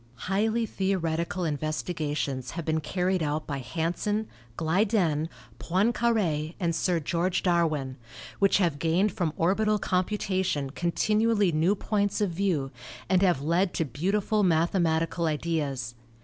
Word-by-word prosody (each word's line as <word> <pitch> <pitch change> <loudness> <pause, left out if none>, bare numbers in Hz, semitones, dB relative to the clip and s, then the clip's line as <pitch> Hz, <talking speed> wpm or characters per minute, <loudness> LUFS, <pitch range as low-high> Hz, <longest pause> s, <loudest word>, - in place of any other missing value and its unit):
Highly 220 +4 +1
theoretical 180 -3 -1
investigations 150 -3 -2
have 170 - -3
been 160 0 +1
carried 180 +3 0
out 155 0 -1
by 140 -2 -3
Hansen, 175 - -2 0.3
Glyden, 165 -2 +1 0.3
Poincare 190 -5 +1
and 170 -3 0
Sir 170 +1 +1
George 170 +4 -1
Darwin, 155 -7 +1 0.4
which 195 -1 +4
have 170 -7 +1
gained 175 +6 +2
from 175 -5 -1
orbital 210 +5 +2
computation 185 -7 -1
continually 210 +5 +2
new 165 +6 +2
points 205 0 0
of 205 -4 +1
view 165 -7 -1 0.4
and 185 -1 +4
have 175 -8 +2
led 175 +4 +1
to 165 - 0
beautiful 195 - 0
mathematical 165 -1 +1
ideas. 150 -6 -2
170 Hz, 120 wpm, -27 LUFS, 155-195 Hz, 0.4 s, which